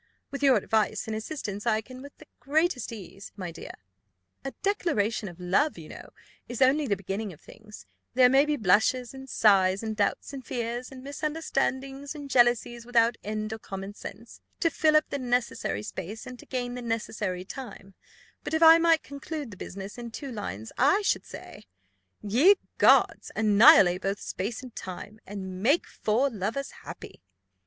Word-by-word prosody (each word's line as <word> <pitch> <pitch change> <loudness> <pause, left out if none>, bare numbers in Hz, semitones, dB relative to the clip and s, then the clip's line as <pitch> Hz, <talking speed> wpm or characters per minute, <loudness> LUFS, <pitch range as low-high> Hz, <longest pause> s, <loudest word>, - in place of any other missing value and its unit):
With 280 - -5
your 270 -2 +5
advice 215 +1 0
and 220 - -4
assistance, 215 -3 -5
I 220 -1 +2
can 255 +3 -12
with 280 +1 -12
the - - -15
greatest 285 0 0
ease, 200 -2 -10
my 185 -4 -6
dear. - - -9 0.7
A 270 - -3
declaration 230 - 0
of 175 0 -14
love, 185 - +1
you 160 -2 -10
know, - - -10 0.4
is 240 - -6
only 275 +3 +3
the 200 - +1
beginning 195 +2 -4
of 150 - -17
things; 210 -1 -14 0.3
there 255 -1 +7
may 270 +2 +5
be 300 - +1
blushes, 235 +3 +2
and 265 0 -10
sighs, 195 -3 +3
and 220 -1 -3
doubts, 205 +6 -1
and 270 -2 -7
fears, 240 +2 -4
and 260 -1 -11
misunderstandings, 280 -1 -3
and 285 -2 -8
jealousies 240 -1 +3
without 235 -1 +3
end 215 +1 -3
or 220 - -6
common 195 -1 -7
sense, 220 +2 -11 0.2
to 330 - +2
fill 310 -1 +3
up 305 - +1
the 280 - -2
necessary 245 - -1
space, 190 - -7
and 250 -1 -9
to - - -14
gain 245 -2 -3
the 250 - -6
necessary 215 -5 -3
time; 195 -4 -9 0.5
but - - -2
if 320 - +3
I 325 +1 +9
might 330 -1 +3
conclude 285 -1 -6
the - - -9
business 195 +4 -8
in 235 -1 -6
two 270 +4 -7
lines, 110 - -6
I 295 +11 +4
should - - 0
say, - - -11 0.6
'Ye 260 - +5 0.2
gods, - - +4
annihilate 200 -4 +6
both 195 +1 -2
space 215 +6 -4
and 250 -3 -11
time, 205 +3 -8
And 190 -2 -6
make 280 - +3
four 245 +6 0
lovers 225 +6 -3
happy. - - -10
235 Hz, 175 wpm, -27 LUFS, 205-275 Hz, 0.7 s, I